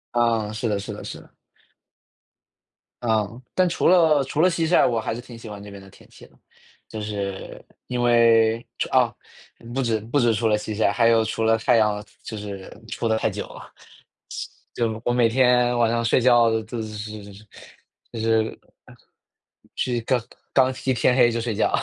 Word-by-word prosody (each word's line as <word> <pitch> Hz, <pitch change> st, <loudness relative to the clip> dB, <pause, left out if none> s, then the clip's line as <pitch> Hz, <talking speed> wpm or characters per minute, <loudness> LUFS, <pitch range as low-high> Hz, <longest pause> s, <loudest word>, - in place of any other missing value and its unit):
啊， 115 Hz, -3 st, +1 dB
是 115 Hz, +1 st, -2 dB
的 100 Hz, -1 st, 0 dB
是 100 Hz, -, -6 dB
的 -, -, -9 dB
是 -, -, -7 dB
的。 -, -, -22 dB, 1.7 s
嗯。 110 Hz, 0 st, -1 dB
但 185 Hz, -1 st, +3 dB
除 170 Hz, -, 0 dB
了 160 Hz, -5 st, +5 dB
除 145 Hz, +3 st, -1 dB
了 185 Hz, -, +5 dB
夕 165 Hz, -1 st, -1 dB
晒， 175 Hz, -, +4 dB
我 115 Hz, -2 st, +1 dB
还 110 Hz, -, -3 dB
是 120 Hz, -, -6 dB
挺 120 Hz, -2 st, -12 dB
喜 115 Hz, -1 st, -10 dB
欢 100 Hz, -1 st, -8 dB
那 105 Hz, -, -10 dB
边 100 Hz, -1 st, -11 dB
的 95 Hz, -, -15 dB
天 -, -, -19 dB
气 -, -, -16 dB
的。 -, -, -27 dB, 0.5 s
就 110 Hz, -1 st, -7 dB
是 100 Hz, -2 st, -5 dB, 0.2 s
因 125 Hz, -1 st, -2 dB
为， 115 Hz, -1 st, +4 dB
除 -, -, -1 dB
啊， -, -, +3 dB, 0.6 s
不 135 Hz, -, 0 dB
止 115 Hz, -3 st, 0 dB
不 115 Hz, +7 st, -1 dB
止 120 Hz, -3 st, +3 dB
除 110 Hz, +2 st, 0 dB
了 105 Hz, -1 st, +3 dB
夕 105 Hz, 0 st, -5 dB
晒， 105 Hz, -1 st, +2 dB
还 115 Hz, +2 st, +3 dB
有 115 Hz, -1 st, +4 dB
除 110 Hz, -, -2 dB
了 115 Hz, 0 st, +3 dB
太 115 Hz, +2 st, +3 dB
阳 105 Hz, -1 st, +1 dB, 0.2 s
就 110 Hz, -, -7 dB
是 100 Hz, -2 st, -7 dB, 0.2 s
出 115 Hz, +2 st, -3 dB
得 110 Hz, 0 st, +2 dB
太 -, -, 0 dB
久 -, -, -6 dB
了。 -, -, -13 dB, 1.0 s
就 115 Hz, -1 st, -2 dB
我 120 Hz, -, +1 dB
每 120 Hz, -2 st, +3 dB
天 125 Hz, 0 st, +3 dB
晚 115 Hz, -1 st, +3 dB
上 115 Hz, 0 st, 0 dB
睡 115 Hz, -, +3 dB
觉 120 Hz, -2 st, +4 dB
就 110 Hz, +1 st, -6 dB
是 105 Hz, -1 st, -7 dB, 0.8 s
就 115 Hz, -, -6 dB
是 110 Hz, 0 st, 0 dB, 1.2 s
去 120 Hz, -2 st, -1 dB
刚 125 Hz, +2 st, +1 dB, 0.3 s
刚 130 Hz, -1 st, +4 dB
一 130 Hz, -, +2 dB
天 125 Hz, +2 st, +2 dB
黑 120 Hz, -2 st, +5 dB
就 115 Hz, -, -2 dB
睡 115 Hz, -1 st, -2 dB
觉。 -, -, +1 dB
115 Hz, 205 characters per minute, -23 LUFS, 110-120 Hz, 1.7 s, 了